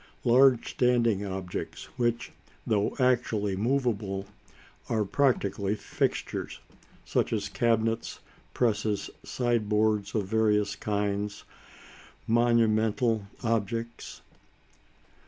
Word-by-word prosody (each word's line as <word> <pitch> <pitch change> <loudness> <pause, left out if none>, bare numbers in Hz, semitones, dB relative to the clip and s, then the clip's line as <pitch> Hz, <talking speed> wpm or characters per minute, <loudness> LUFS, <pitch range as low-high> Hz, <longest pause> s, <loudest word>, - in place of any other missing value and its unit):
Large 125 0 +4
standing 120 -5 +2
objects 95 -2 -5
which, 120 -2 -1 0.3
though 105 -2 +1
actually 120 -6 +1
movable, 105 -4 -1 0.6
are 110 -2 +1
practically 100 -5 +1
fixtures, - - -3 0.5
such - - 0
as - - -1
cabinets, 115 -1 0 0.4
presses, 110 -3 0
sideboards 110 -3 0
of 105 -3 +1
various 105 0 +1
kinds; 105 -1 -2 0.8
monumental 115 -1 +2 0.2
objects. 115 +1 -2
110 Hz, 80 wpm, -28 LUFS, 105-120 Hz, 0.8 s, Large